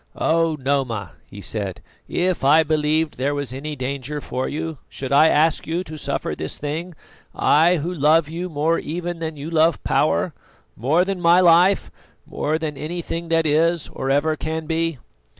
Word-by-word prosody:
"Oh! 165 -1 +1
Noma," 130 - -1 0.2
he 100 - -10
said, 100 -1 -3 0.3
"if 180 -4 -1
I 150 +4 +6
believed 155 0 +1
that - - -21
there 140 +3 0
was 140 -4 -4
any 150 +3 -5
danger 140 +2 -4
for 130 -2 -3
you, 160 -1 -4
should 135 -1 -6
I 145 +3 +6
ask 160 +1 +2
you 170 +3 -1
to 155 - -9
suffer 150 - -3
this - - -4
thing? 160 +4 -4 0.4
I, 165 +4 +4
who 170 +2 -3
love 155 0 +3
you 170 +3 -5
more 160 +2 +1
even 175 +2 -4
than 160 -2 -4
you 145 +4 -6
love 165 -1 +2
power, - - +1 0.4
more 150 - +2
than 195 -2 -3
my 170 +1 +5
life, 180 +2 +4 0.3
more 155 +2 -1
than 155 -3 -4
anything 170 +1 -4
that 165 -1 +2
is 160 +2 +2
or 135 - -4
ever 145 +3 +2
can 160 +1 -4
be." 165 -1 -1
155 Hz, 175 wpm, -22 LUFS, 145-165 Hz, 0.4 s, I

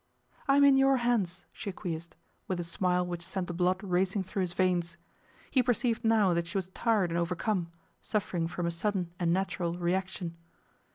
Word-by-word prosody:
'I 275 - +5
am 285 - +6
in 280 -1 +7
your 270 0 +5
hands,' 225 -7 0
she - - -5
acquiesced, 170 -3 -5 0.3
with 185 -2 -2
a - - -1
smile 180 +1 0
which 175 -1 -4
sent 185 +1 -3
the 175 - -5
blood 180 +2 +1
racing 190 +1 +1
through 190 +2 -5
his 180 -2 -1
veins. 175 -2 +1 0.5
He 260 - +4
perceived 245 -1 0
now 220 -5 +4
that 170 0 0
she 170 - -3
was 185 -1 -2
tired 205 -3 +1
and 170 - 0
overcome, 175 +1 -1 0.3
suffering 180 -6 -1
from 175 0 -3
a 170 - 0
sudden 180 0 -1
and 170 -2 +2
natural 180 -2 -1
reaction. 180 -1 -2
185 Hz, 185 wpm, -30 LUFS, 170-205 Hz, 0.5 s, in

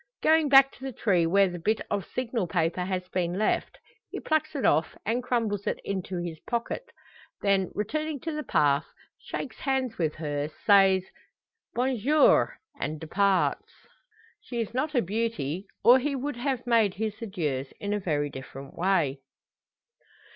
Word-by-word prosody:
Going 315 -1 +4
back 270 0 +7
to 265 - -16
the 270 - -3
tree 185 -8 +2
where 195 +3 +4
the 175 -1 -6
bit 215 +6 +1
of 200 -2 -1
signal 235 -6 -2
paper 170 +1 0
has 185 -1 -3
been 180 -1 -1
left, 215 - 0 0.3
he - - -5
plucks 315 -1 0
it 275 - -1
off, 155 +3 +2
and 230 +4 0
crumbles 225 -5 -1
it - - -1
into 190 -1 -3
his 170 -2 -5
pocket. 250 - -3 0.5
Then, 195 -2 +2
returning 305 +8 -2
to 325 - -3
the 305 0 -3
path, 145 - +2 0.3
shakes 255 - -6
hands 265 -5 -1
with 155 -3 0
her, 145 -2 -3 0.2
says 195 -2 +6 0.7
"Bonjour!" 260 +4 +3 0.2
and 155 0 -3
departs. 190 +4 +1 0.7
She 240 - -6
is 225 -1 -3
not 295 +4 -1
a 245 - +3
beauty, 200 -4 -2 0.2
or 250 +2 +8
he 280 +2 -1
would 275 0 -3
have 255 -1 -2
made 225 -5 +3
his 220 +1 -4
adieus 150 - -3
in 205 0 -2
a 210 - 0
very 145 -6 -1
different 135 +1 -9
way. 170 -7 +1
205 Hz, 160 wpm, -27 LUFS, 175-250 Hz, 0.7 s, or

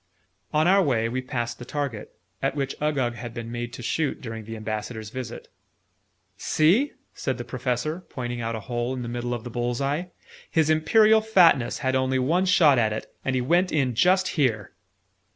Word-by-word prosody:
On 155 +2 +3
our 195 +2 +5
way, 120 -9 +1
we 125 +3 -2
passed 120 -2 -4
the - - -7
target, 135 -4 -4 0.3
at 135 +1 0
which 135 -2 -2
Uggug 140 -6 0
had 120 -1 -8
been 115 -1 -6
made 120 0 -4
to 120 - -8
shoot 150 +5 -1
during 115 -3 -7
the 115 +1 -6
Ambassador's 110 0 -5
visit. 125 -2 -7 0.9
"See!" 195 - +2 0.2
said 130 -3 -3
the 120 - -5
Professor, 125 +6 -2
pointing 120 -2 -4
out 115 0 -2
a 110 - -5
hole 120 +4 -2
in 125 - -4
the - - -5
middle 120 +1 -3
of 115 - -7
the 120 - -7
bull's 120 0 -2
eye. 145 +6 -1 0.4
"His 160 -1 +2
Imperial 215 +8 +5
Fatness 175 - +4
had 130 - +2
only 130 0 +1
one 165 +9 +1
shot 155 -8 +5
at 110 -2 +2
it; 110 - -7
and 135 - -1
he 130 - +1
went 175 +8 +2
in 135 -5 +1
just 185 - +3
here!" 115 - 0
130 Hz, 190 wpm, -25 LUFS, 120-155 Hz, 0.9 s, our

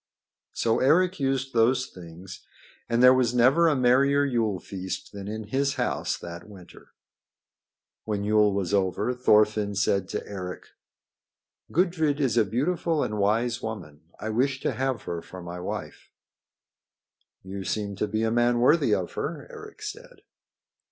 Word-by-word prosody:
So 115 -1 +1
Eric 180 +6 +3
used 135 -1 -1
those 120 +2 +3
things, 90 +1 -11 0.5
and 120 +1 +2
there 125 0 +9
was 125 -2 +1
never 135 +8 +5
a 155 - +3
merrier 140 +3 +3
Yule 115 -7 0
feast 95 -1 -6
than 100 -1 -8
in 110 +1 -5
his 140 +2 0
house - - -1
that 85 +4 -9
winter. 95 -4 -15 1.1
When 105 -2 -2
Yule 105 0 +3
was 100 -1 -2
over, 100 +5 +1
Thorfinn 105 -4 +3
said 100 -1 +1
to - - -4
Eric: 90 -2 -7 1.0
"Gudrid 160 -5 +1
is 130 -6 +1
a 115 - +5
beautiful 155 - 0
and 105 0 -3
wise 115 +4 +1
woman. 90 -10 -7 0.2
I 110 - -4
wish 130 +4 0
to - - 0
have 130 -4 -2
her 85 -1 -4
for 95 - -11
my 85 +1 -7
wife." 90 - -6 1.3
"You 95 +1 -6
seem 100 0 -3
to 105 - -1
be 110 +2 -1
a 110 - +1
man 120 +1 +2
worthy 140 +7 +4
of - - -3
her," - - -4
Eric 430 -2 -11
said. 470 +4 -9
115 Hz, 150 wpm, -26 LUFS, 100-135 Hz, 1.3 s, there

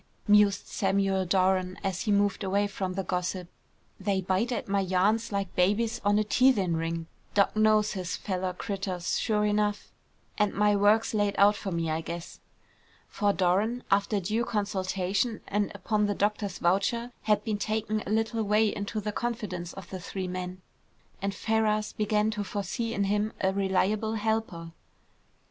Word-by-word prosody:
mused 205 -1 +4
Samuel 195 -1 0
Doran 185 0 +2
as 190 -1 -1
he 215 - 0
moved 205 0 +2
away 200 +2 +1
from 195 -2 -3
the 195 +1 -2
gossip. 180 0 -2 0.5
"They 200 -2 0
bite 190 +6 0
at 240 - -3
my 200 0 +1
yarns 195 +5 +1
like 200 -2 -3
babies 220 +6 +1
on 205 0 +3
a 215 - +3
teethin' 210 -6 +3
ring. 165 0 -2 0.3
Doc. 200 0 +3
knows 215 -1 +4
his 180 -3 -3
fellow 185 -2 -2
critters, 185 -2 -3
sure 210 -2 +1
enough, 210 0 0 0.5
and 210 -1 +2
my 210 0 +3
work's 210 +3 +3
laid 205 -2 +1
out 205 +1 +6
for 200 -1 -5
me, 165 -2 -1
I 160 +1 -1
guess." 170 +1 -7 0.7
For 205 -2 +1
Doran, 200 +6 +1
after 200 +1 +2
due 215 +5 -1
consultation, 200 +1 -1
and 205 0 0
upon 210 +1 0
the 205 - -1
doctor's 205 -1 -1
voucher, 230 +7 +1
had 210 -1 +2
been 215 -2 -2
taken 215 0 -1
a - - -7
little 225 +1 0
way 210 +1 +2
into 205 +2 -3
the 210 +1 -3
confidence 210 -7 -3
of 190 -2 -10
the 190 - -5
three 185 +1 -5
men, 185 0 -5 0.6
and 195 0 -2
Ferrars 215 0 0
began 210 0 +1
to 210 -1 -3
foresee 205 +4 -3
in 200 - +1
him 210 +2 0
a 190 0 +1
reliable 200 +3 +1
helper. 215 -6 -2
200 Hz, 165 wpm, -28 LUFS, 185-215 Hz, 0.7 s, out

